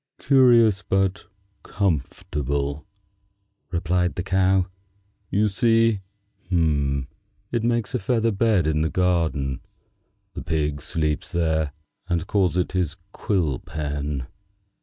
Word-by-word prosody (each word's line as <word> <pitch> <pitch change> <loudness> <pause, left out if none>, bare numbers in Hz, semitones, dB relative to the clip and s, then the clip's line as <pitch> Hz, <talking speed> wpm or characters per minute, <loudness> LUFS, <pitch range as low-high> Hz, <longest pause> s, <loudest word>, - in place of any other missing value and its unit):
"Curious, 120 -7 +5
but 95 -2 0 0.4
comfortable," 70 - -2 0.8
replied 90 0 0
the 90 - -2
Cow. 95 -1 +2 0.6
"You 105 +2 +2
see, 115 0 +3 0.5
it 80 - -1
makes 120 -1 0
a - - 0
feather 115 +3 +1
bed 100 -4 +2
in 75 0 +1
the 80 - +1
garden. 80 -8 0 0.7
The - - -6
pig 75 -2 -1
sleeps 75 +4 -2
there, 80 -3 0 0.4
and 85 -1 0
calls 95 -3 +1
it 90 - 0
his 90 -4 -1 0.2
quill 85 - -1
pen. 75 -2 -4
90 Hz, 105 wpm, -24 LUFS, 75-100 Hz, 0.8 s, Curious